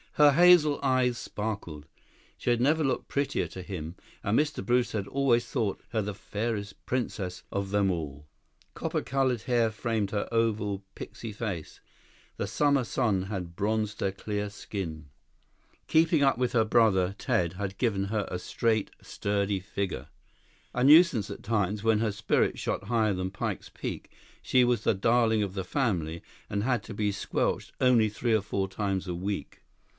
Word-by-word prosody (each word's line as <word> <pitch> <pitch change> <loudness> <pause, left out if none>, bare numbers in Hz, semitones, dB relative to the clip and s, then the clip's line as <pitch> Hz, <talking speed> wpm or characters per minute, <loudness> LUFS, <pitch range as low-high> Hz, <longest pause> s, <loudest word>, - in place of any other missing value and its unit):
Her 150 -1 +7
hazel 165 -2 +6
eyes 130 -2 +2
sparkled. 100 -11 -5 0.5
She - - -2
had 120 -1 +3
never 155 +5 +3
looked 130 -3 -1
prettier 140 0 -1
to 95 - -8
him, 90 -3 -6 0.3
and 105 +3 +2
Mr. 150 -9 0
Brewster 120 0 +1
had 100 - -5
always 125 -4 +2
thought 110 -6 -1
her 110 -2 0
the 105 0 -3
fairest 105 -1 -4
princess 100 -7 -3
of 100 -1 -2
them 100 -1 +2
all. 75 -4 -5 0.5
Copper - - -2
colored 130 -4 0
hair 120 -3 +2
framed 110 -2 -1
her 105 -1 -1
oval, 110 -4 0
pixie 115 +1 -7
face. 100 -6 -5 0.6
The 100 - -2
summer 140 +5 +2
sun 110 -6 0
had 95 -4 -5
bronzed 105 +1 -1
her 95 - +1
clear 105 +1 -3
skin. 90 -7 -6 0.8
Keeping 160 -2 +4
up 135 -3 +3
with 125 0 0
her 115 -2 +4
brother 100 -5 +3
Ted 85 -2 0
had 95 0 -4
given 100 -6 +1
her 105 0 -2
a 90 - -3
straight, 110 +2 0
sturdy 100 -1 -1
figure. 95 0 -4 0.7
A 125 - 0
nuisance 150 - +6
at - - -8
times, 105 -1 0
when 110 -1 +3
her 110 -1 +1
spirits 100 0 +1
shot - - -2
higher 110 -1 +2
than 95 0 -3
Pike's 95 - -4
Peak, - - -6 0.3
she 130 -1 +3
was 120 -3 +1
the - - +2
darling 115 +2 +3
of 100 -2 -4
the 95 -1 -3
family, 90 - -1 0.3
and 100 0 -1
had 125 0 +1
to 110 - -8
be 105 0 0
squelched 100 - -1
only 120 -4 +4
three 115 +2 -1
or 110 - +3
four 100 -1 -2
times 95 -1 -2
a 90 - -2
week. 100 +3 -4
105 Hz, 170 wpm, -28 LUFS, 95-120 Hz, 0.8 s, Her